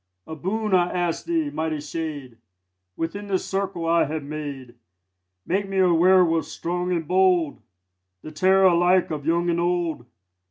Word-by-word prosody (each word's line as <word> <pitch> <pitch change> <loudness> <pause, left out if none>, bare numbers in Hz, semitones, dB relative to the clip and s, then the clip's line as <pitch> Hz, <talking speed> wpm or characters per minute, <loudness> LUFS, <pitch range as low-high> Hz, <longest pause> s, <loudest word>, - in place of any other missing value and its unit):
A 160 - -7
boon 210 +6 -2
I 180 -1 +3
ask 175 -2 -2
thee, 325 -3 -1
mighty 160 - -2
shade. 145 -5 -6 0.6
Within 200 +6 -4
this 190 -2 -1
circle 195 -3 -3
I 170 +1 +3
have 155 +1 -4
made, 140 -4 -7 0.7
Make 195 +2 -1
me 195 - -3
a 185 -2 +4
werwolf 170 -1 +4
strong 180 +1 -3
and 165 -3 -2
bold, 180 -4 +2 0.6
The 155 - -8
terror 190 +5 +3
alike 180 0 +3
of 150 -1 -5
young 170 +1 +1
and 170 - -1
old. 170 -7 -1
170 Hz, 155 wpm, -23 LUFS, 160-185 Hz, 0.7 s, a